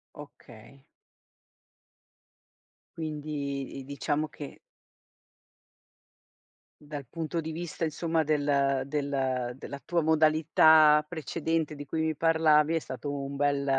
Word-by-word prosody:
Okay. 135 -3 -14 2.1
Quindi, 145 -4 -4
i 135 - -7
diciamo 145 +2 -2
che 145 0 -10 2.2
dal 145 -3 -8
punto 165 +3 -3
di 160 0 -5
vista 170 0 -4
insomma 160 +1 -1
del 140 -3 +1
del 135 -4 -2
della 140 +1 -8
tua 170 -2 0
modalità 155 -1 +5
precedente 160 -1 -2
di 145 -1 -8
cui 160 +3 -2
mi 160 0 -1
parlavi, 160 0 +3
è - - +2
stato 145 -1 -6
un 140 0 -5
bel 140 0 +1
150 Hz, 105 wpm, -28 LUFS, 140-160 Hz, 2.2 s, modalità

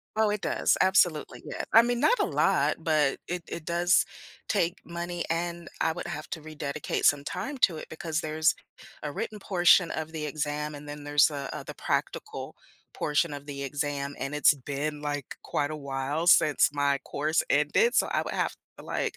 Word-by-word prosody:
Oh, 220 -1 +3
it 210 -1 -2
does, - - +2
absolutely, 180 -5 +2
yeah. - - -4
I 225 - +9
mean, 245 0 0
not 485 - +4
a 410 - +2
lot, - - +2
but 155 -4 +2
it 180 0 -3
it 165 - -6
does 175 +2 +3 0.4
take 175 -3 +1
money, 170 0 -4
and 170 +1 -2
I 160 - +2
would 175 - -6
have 155 -3 -6
to 160 - -5
rededicate 155 -1 -2
some 145 0 +4
time 215 - -4
to 165 -4 +4
it, - - -7
because 160 +1 -3
there's 155 +1 +1 0.5
a 150 - -3
written 210 +8 -4
portion 180 -2 +4
of 160 0 -4
the 155 -2 -3
exam, 150 0 -3
and 145 +1 -9
then 145 0 -8
there's 145 +1 +4
a, 140 -2 -5
uh, - - -5
the - - -8
practical - - -3 0.4
portion 150 +2 0
of 145 0 -7
the 140 -1 -5
exam, 140 0 -3
and 135 - -3
it's 150 - +6
been, 145 +2 -4
like, 145 -2 -4
quite 145 0 -1
a 155 - -4
while 140 +3 -3
since 155 -4 +5
my 140 -1 +2
course 155 +4 0
ended, 475 +1 +3
so - - +4
I - - +1
would - - -5
have - - 0 0.3
to, - - -11
like - - -2
155 Hz, 195 wpm, -28 LUFS, 145-175 Hz, 0.5 s, I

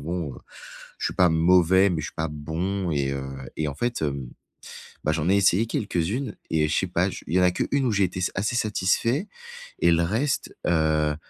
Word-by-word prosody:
bon, 80 -3 -4 0.6
je - - -1
suis - - -3
pas 90 - +5
mauvais, 90 +3 +4
mais 85 -3 -1
je 75 - -4
suis - - -10
pas 80 +1 -1
bon 85 +5 -3
et 70 -2 0
heu 70 -1 -4 0.3
et 80 - -1
en 70 - -5
fait, 120 +6 -2
hem, 70 -4 -2 0.8
bah 75 - +1
j'en 80 0 -1
ai 100 - +4
essayé 100 +2 +3
quelques-unes 105 +4 -2 0.2
et 80 -1 +2
je 75 - -1
sais - - +1
pas, - - +1
je - - -8
il 80 - -4
y - - +5
en - - +4
a 90 - +6
qu'une 135 +9 0
où 120 - +1
j'ai 100 -1 +2
été 90 +1 -5
s 90 - 0
assez 105 +5 -1
satisfait 115 - +1 0.5
et - - +4
le 85 0 +3
reste, 115 - -1
heu, 80 -2 +2
85 Hz, 220 wpm, -25 LUFS, 80-100 Hz, 0.8 s, a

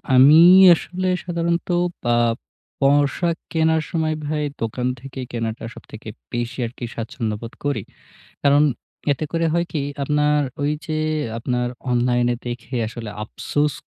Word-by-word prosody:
আমি 140 +5 +8 0.4
আসলে 185 +3 -4 0.2
সাধারণত 170 -1 -1 0.5
আ - - +4 0.6
পোশাক 145 +4 +2 0.2
কেনার 160 -1 +2
সময় 160 -2 0
ভাই 150 0 -1 0.2
দোকান 125 +3 -2
থেকে 135 0 -9
কেনাটা 115 -1 -3
সবথেকে - - -10 0.2
বেশি 120 0 -3
আরকি 120 +1 -6
স্বাচ্ছন্দ্যবোধ 115 0 -4
করি। 145 -1 -1 0.6
কারণ 145 +1 +5 0.5
এতে 140 +3 -1
করে 165 0 0
হয় 170 0 +1
কি? 150 - -1 0.2
আপনার 150 +1 +2 0.2
ওই 145 - +1
যে 155 -1 -2 0.4
আপনার 125 +1 -1 0.2
অনলাইনে 120 0 +2
দেখে 120 +2 -6
আসলে 115 -1 -7
আফসোস 145 +6 -1
140 Hz, 125 wpm, -21 LUFS, 120-155 Hz, 0.6 s, আমি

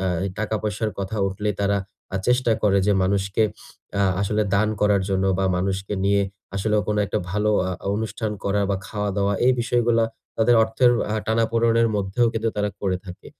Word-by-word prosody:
অ্যা 95 - 0 0.3
টাকা 110 +1 -1
পয়সার 105 +1 -1
কথা 100 +3 -3
উঠলেই, 105 +2 -2
তারা 100 0 +2 0.4
আ - - +2
চেষ্টা 125 -1 +3
করে 100 -2 +4
যে, 105 - +4
মানুষকে 100 +2 +1 0.6
আ - - +4 0.2
আসলে 105 +2 +1
দান 105 +2 +3
করার 105 -2 +3
জন্য 95 0 +1
বা, 95 - +1
মানুষকে 95 +2 -2
নিয়ে 100 0 +3 0.3
আসলেও 105 +2 +1
কোন 105 - +1
একটা - - -1
আ - - -13
ভালো 105 +2 +1 0.4
অনুষ্ঠান 110 0 -3
করা 100 +1 +1
বা, 100 - +1
খাওয়া-দাওয়া, 100 -1 -1
এই 130 - +6
বিষয়গুলা 120 -1 +2 0.3
তাদের 115 +2 +4
অর্থের 115 +3 +3 0.2
আ - - 0
টানাপোড়নের 115 +1 +2
মধ্যেও 100 +4 +1
কিন্তু 115 0 -1
তারা 105 0 +1
করে 95 -2 0
থাকে। 90 - -10
105 Hz, 175 wpm, -23 LUFS, 100-110 Hz, 0.6 s, এই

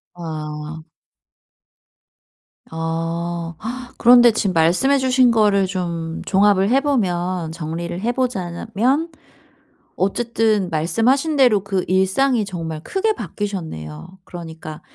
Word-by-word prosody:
아. 155 -1 -6 1.9
어. 165 +1 -3 0.4
그런데 240 -1 +7
지금 195 -3 -1
말씀해 180 +13 +3
주신 255 -2 +3
거를 205 -3 +3
좀 170 -3 -4
종합을 200 0 +3
해 265 +2 +4
보면 180 - -1
정리를 170 +2 -5
해 235 +2 0
보자 240 -9 -2
자면 250 - -1 0.8
어쨌든 215 -1 0
말씀하신 235 - +1
대로 235 -8 +4
그 195 -2 -1
일상이 200 +6 +2
정말 165 -5 -5
크게 430 +3 0
바뀌셨네요. 175 - -6
그러니까 160 -3 -9
190 Hz, 220 characters per minute, -20 LUFS, 165-235 Hz, 1.9 s, 그런데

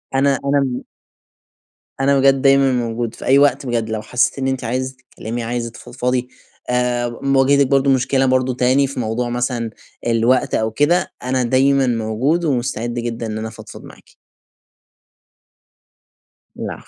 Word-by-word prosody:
أنا 135 -1 +2
أنا 140 -3 0 1.2
أنا 140 +1 +3
بجد 135 0 +4
دايمًا 135 0 +4
موجود، 120 -2 -2
في - - -9
أي 135 +2 +5
وقت 145 -1 +3
بجد 115 -3 -2
لو 110 -1 -3
حسّيتِ 125 +5 0
إن 135 - -1
أنتِ 130 -1 -2
عايزة 130 +2 -3
تتكلمي، 120 -2 -7
عايزة 120 0 -3
تفضفضي، 125 +1 -3 0.4
آآ 125 -1 0
م 135 0 +1
واجهتِك 140 +1 +4
برضه 135 +1 +2
مشكلة 130 0 +2
برضه 130 0 +1
تاني 130 +3 +2
في 135 - -6
موضوع 120 +1 -2
مثلًا 120 -1 -2 0.4
الوقت 120 +2 +2
أو 110 0 0
كده، 155 +9 +1
أنا 130 0 0
دايمًا 135 +2 +3
موجود 120 +9 0
ومستعد 120 -4 -1
جدًا 120 -1 -4
إن 110 -1 -4
أنا 110 - -4
افضفض 110 - -11
معاكِ. - - -15 2.5
العفو. - - -5
125 Hz, 145 wpm, -19 LUFS, 120-135 Hz, 2.5 s, أي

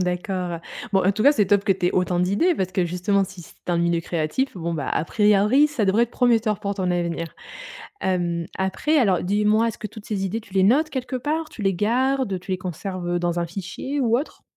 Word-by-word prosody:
D'accord. 180 -1 -2 0.3
Bon, 190 -1 +3
en 195 - +4
tout 215 - -2
cas 285 - +7
c'est 210 -9 +2
top 200 0 +3
que - - +1
tu 180 -2 +2
aies - - +2
autant 180 -1 +1
d'idées, 200 - +2
parce 185 -5 -2
que 180 -1 +1
justement 180 +3 +1
si 190 -2 -7
c'est - - -16 0.2
un 170 - +2
milieu 170 0 +1
créatif, 170 - -2
bon, 170 -1 -3
bah, 145 -4 -3
à - - 0
priori 210 - +4
ça 265 -8 -1
devrait 200 +5 +3
être 240 - -14
prometteur 225 -5 +2
pour 200 -1 -3
ton 185 -2 -1
avenir. 170 -2 -2 0.7
Hem, 175 -2 -1
après, 190 +12 0
alors 195 - +3
dis-moi 210 +4 +2
est-ce 225 - -4
que 215 - -5
toutes 210 +1 -12
ces 200 -3 -2
idées 215 +4 -2
tu 205 -3 -17
les 190 - +3
notes 285 +10 +4
quelque 255 -2 -3
part? 305 +4 -2
Tu 220 - -10
les 195 -1 +2
gardes? 240 +1 0
Tu 185 - -8
les 185 - 0
conserves, 185 0 -5
heu, 175 0 0
dans 175 0 -1
un 170 - 0
fichier 195 - -5
ou 235 -2 +3
autre? 290 - -6
195 Hz, 235 wpm, -23 LUFS, 180-225 Hz, 0.7 s, cas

